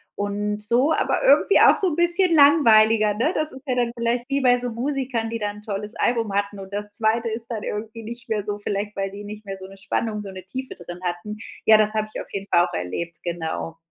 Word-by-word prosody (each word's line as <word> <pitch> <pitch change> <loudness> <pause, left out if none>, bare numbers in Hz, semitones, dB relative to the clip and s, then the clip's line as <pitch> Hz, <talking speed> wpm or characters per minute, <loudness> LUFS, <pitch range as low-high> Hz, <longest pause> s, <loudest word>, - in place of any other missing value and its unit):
und 205 +1 -3
so, 240 +8 +2
aber - - 0
irgendwie - - +5
auch - - +7
so 380 - +6
'n 300 - -3
bisschen 345 +1 +6
langweiliger, 225 -8 +5
ne? 235 +10 0
Das 310 0 0
ist 265 - -11
ja 255 - 0
dann 240 -1 0
vielleicht 235 +1 -1
wie 275 0 0
bei 245 -1 +4
so 245 - -3
Musikern, 250 -2 -2
die 230 - -3
da 210 -1 -2
'n 210 0 -12
tolles 210 +1 -5
Album 230 -4 0
hatten 200 0 -1
und 195 +1 -10
das 205 0 -3
2. 225 +2 +1
ist 225 +1 -4
dann 220 -3 -3
irgendwie 220 +2 -5
nicht 235 +2 -9
mehr 215 -3 -1
so, 205 0 -4
vielleicht 205 0 -4
weil 195 0 -3
die 205 +1 -9
nicht 210 +1 -9
mehr 195 -1 -6
so 190 - -10
'ne 195 0 -14
Spannung, 210 +2 -2
so 200 - -8
'ne 185 -1 -10
Tiefe 260 +7 -6
drin 175 0 -10
hatten. 180 +4 -4 0.3
Ja, 220 0 +7
das 215 0 +2
habe 215 0 -1
ich - - -5
auf - - -12
jeden 200 0 -5
Fall 175 -1 +4
auch - - -11
erlebt, 160 - -4
genau. 165 -1 -4
215 Hz, 245 wpm, -23 LUFS, 200-240 Hz, 0.3 s, auch